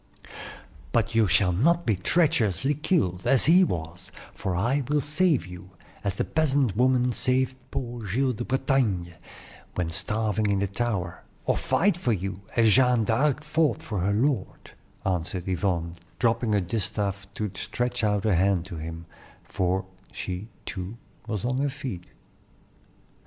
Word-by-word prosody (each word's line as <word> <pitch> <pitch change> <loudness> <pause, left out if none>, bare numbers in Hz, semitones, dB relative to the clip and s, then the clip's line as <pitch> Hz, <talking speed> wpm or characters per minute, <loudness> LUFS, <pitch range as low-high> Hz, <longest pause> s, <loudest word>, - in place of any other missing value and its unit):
"But 115 0 +1
you 115 -2 +4
shall 95 -1 +3
not 165 - +2
be 110 - +2
treacherously 135 - +2
killed, 140 - 0
as 135 - +5
he 180 +4 +6
was; 85 - -4 0.2
for 95 -2 -3
I 120 +10 +1
will 150 0 +2
save 150 - +2
you, 90 0 -10 0.3
as 100 -3 0
the - - 0
peasant 140 - +1
woman 125 +1 +3
saved 130 +2 +1
poor 120 -2 -4
Giles 130 +7 +1
de 120 +2 -4
Bretagne 125 -10 0 0.6
when 85 -2 -1
starving 105 +3 0
in 100 - +2
the 100 - +1
tower, 100 -4 -2 0.2
or - - +2
fight 200 +1 +2
for 125 -9 +1
you, 95 -1 -4
as 115 -2 +5
Jeanne 125 -1 +4
d'Arc 135 +7 +1
fought 150 -5 +1
for 105 -4 -3
her 95 +3 +1
lord," 120 -1 -1 0.3
answered 90 -1 -2
Yvonne, 90 -2 -1 0.2
dropping 115 -2 +1
her 100 - +3
distaff 100 0 -3
to 105 -2 -3
stretch 120 +5 -2
out 105 -2 +1
her 110 -2 +2
hand 90 0 +2
to 90 -3 -7
him; 80 +1 -6 0.4
for 95 +1 -1 0.3
she, 95 +3 -5 0.2
too, 100 +2 -5 0.3
was 105 -3 -3
on 125 +1 0
her 140 +1 +1
feet. 115 -10 -6
110 Hz, 150 wpm, -26 LUFS, 95-130 Hz, 0.6 s, he